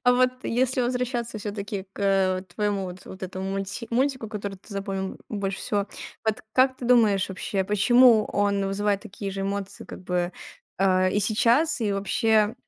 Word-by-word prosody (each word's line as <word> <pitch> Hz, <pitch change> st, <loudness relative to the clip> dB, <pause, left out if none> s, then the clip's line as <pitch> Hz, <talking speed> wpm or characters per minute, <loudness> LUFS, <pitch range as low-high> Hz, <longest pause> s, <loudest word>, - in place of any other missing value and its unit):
А 245 Hz, -, +6 dB
вот 255 Hz, 0 st, +4 dB
если 255 Hz, +2 st, +1 dB
возвращаться 245 Hz, -2 st, -1 dB
всё-таки 205 Hz, -1 st, -4 dB
к, -, -, -10 dB
э, 195 Hz, -1 st, +3 dB
вот 185 Hz, 0 st, -7 dB
твоему 200 Hz, +1 st, -1 dB
вот 180 Hz, 0 st, -8 dB
вот 190 Hz, -, -10 dB
этому 190 Hz, +1 st, -4 dB
мульти 195 Hz, +4 st, -4 dB
мультику, 255 Hz, -2 st, 0 dB
который 200 Hz, -2 st, -5 dB
ты 200 Hz, +3 st, -14 dB
запомнил 195 Hz, -1 st, -4 dB
больше 195 Hz, -2 st, -3 dB
всего. 205 Hz, -1 st, -1 dB, 0.4 s
Вот 220 Hz, -1 st, 0 dB
как 260 Hz, 0 st, +4 dB
ты 245 Hz, -, -8 dB
думаешь, 220 Hz, -6 st, +4 dB
вообще, 190 Hz, +1 st, -2 dB
почему 220 Hz, +3 st, +5 dB
он 200 Hz, -1 st, +1 dB
вызывает 200 Hz, +1 st, 0 dB
такие 200 Hz, 0 st, -6 dB
же 195 Hz, 0 st, -4 dB
эмоции, 195 Hz, 0 st, -4 dB
как -, -, -10 dB
бы, 180 Hz, 0 st, -1 dB, 0.5 s
а, 185 Hz, -1 st, +3 dB
и 200 Hz, +3 st, +1 dB
сейчас, 235 Hz, -, +3 dB
и 210 Hz, -3 st, +1 dB
вообще 215 Hz, +2 st, +2 dB
205 Hz, 175 wpm, -25 LUFS, 195-230 Hz, 0.5 s, А